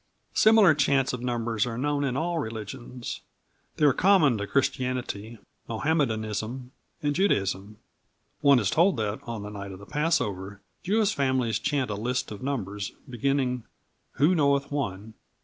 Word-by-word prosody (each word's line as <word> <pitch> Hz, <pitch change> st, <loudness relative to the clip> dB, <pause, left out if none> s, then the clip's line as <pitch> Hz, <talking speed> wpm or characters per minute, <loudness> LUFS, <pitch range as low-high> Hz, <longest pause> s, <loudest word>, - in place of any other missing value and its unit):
Similar 215 Hz, -6 st, +6 dB
chants 140 Hz, -3 st, +2 dB
of 125 Hz, -, -4 dB
number 120 Hz, -2 st, -2 dB
are 115 Hz, -2 st, -3 dB
known 145 Hz, +2 st, 0 dB
in 130 Hz, -2 st, -1 dB
all 170 Hz, +2 st, -1 dB
religions. 120 Hz, +1 st, -6 dB, 0.6 s
They 150 Hz, -, +3 dB
are 140 Hz, -, +6 dB
common 165 Hz, -, +4 dB
to 100 Hz, -, -3 dB
Christianity, 125 Hz, -5 st, -1 dB, 0.3 s
Mohammedanism 115 Hz, -2 st, -1 dB, 0.3 s
and 145 Hz, 0 st, +1 dB
Judaism. 100 Hz, -, 0 dB, 0.6 s
One 140 Hz, -2 st, +6 dB
is 105 Hz, -4 st, +1 dB
told 175 Hz, +2 st, +3 dB
that, 110 Hz, -1 st, -2 dB
on 115 Hz, -3 st, -5 dB
the 105 Hz, -, -6 dB
night 100 Hz, -1 st, -7 dB
of 95 Hz, -, -8 dB
the 100 Hz, -, -12 dB
Passover, 105 Hz, -, -1 dB, 0.2 s
Jewish 210 Hz, +1 st, +2 dB
families 130 Hz, -5 st, +1 dB
chant 140 Hz, -5 st, -1 dB
a -, -, -2 dB
list 120 Hz, +4 st, -2 dB
of 105 Hz, -, -7 dB
numbers, 105 Hz, -7 st, -3 dB
beginning 125 Hz, 0 st, 0 dB, 0.5 s
"Who 155 Hz, +6 st, +3 dB
knoweth 140 Hz, -3 st, +2 dB
One?" 110 Hz, -6 st, -3 dB
125 Hz, 150 wpm, -27 LUFS, 110-145 Hz, 0.6 s, Similar